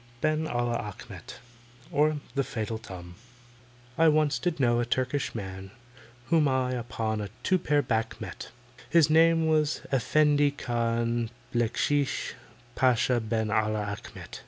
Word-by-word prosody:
BEN 155 +3 0
ALLAH 120 -3 -1
ACHMET; 105 +2 -9 0.5
OR, 150 +1 +2 0.2
THE 140 - +1
FATAL 110 -3 -4
TUM 90 -5 -10 0.9
I 165 - +6
ONCE 150 -4 +3
did 165 +4 -1
know 120 -2 +3
a - - +2
Turkish 130 +3 -1
man 95 -2 -6 0.6
Whom 160 -3 +4
I 130 -1 +1
upon 115 -3 -2
a 100 - -5
two 185 0 +2
pair 145 -3 +2
back 115 -2 -1
met, - - -7 0.4
His 160 -3 +5
name 165 +1 +5
it - - +1
was 155 -1 +1
EFFENDI 145 +1 +3
KHAN 115 -1 -1 0.2
BACKSHEESH 135 +4 0 0.4
PASHA 125 -1 +3
BEN 110 -1 -1
ALLAH 110 -1 0
ACHMET. 105 - -9
125 Hz, 135 wpm, -28 LUFS, 110-150 Hz, 0.9 s, I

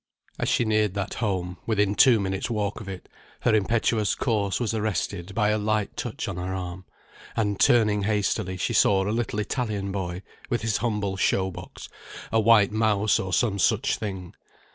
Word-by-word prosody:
As - - 0
she 120 - +2
neared 110 -2 +1
that 100 0 -3
home, 90 -4 -2
within 105 -3 +2
two 120 0 +6
minutes' 95 +1 -2
walk 105 -2 -2
of 100 - -8
it, 95 -1 -8 0.3
her 120 - +2
impetuous 110 0 +1
course 100 -6 0
was 115 -3 -1
arrested 100 -3 -2
by 105 -1 +2
a 105 0 +1
light 105 -1 -1
touch 120 -3 -4
on 100 -3 -4
her 90 +1 -3
arm, 90 0 -6 0.5
and 105 -3 0
turning 105 -4 +4
hastily, 100 -3 0
she - - -1
saw 95 -1 +4
a 105 - 0
little 115 -2 -2
Italian 105 -3 -2
boy 95 -1 -4 0.3
with 120 -2 -1
his 110 -1 +1
humble 105 -4 -2
show 95 0 +1
box, - - -10 0.4
a 115 - +3
white 110 -2 +5
mouse, 110 -1 +2
or 95 - -3
some 100 0 +1
such - - +2
thing. 95 -4 -6
105 Hz, 180 wpm, -25 LUFS, 95-110 Hz, 0.5 s, two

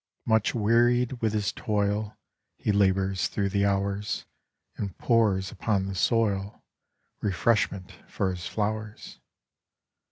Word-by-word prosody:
Much 110 0 +2
wearied 120 +3 +2
with 110 -2 +1
his 105 -1 0
toil 105 0 -1 0.4
He - - 0
labours 95 -1 +2
thro' 100 -2 -1
the 100 +1 +1
hours, 100 +1 -1 0.5
And 100 -4 -5
pours 105 -5 +2
upon 100 -4 0
the 95 - -4
soil 100 0 0 0.6
Refreshment 100 -1 0 0.2
for 95 - -1
his 90 -1 -5
flowers. 105 0 -4
105 Hz, 115 wpm, -27 LUFS, 95-110 Hz, 0.6 s, Much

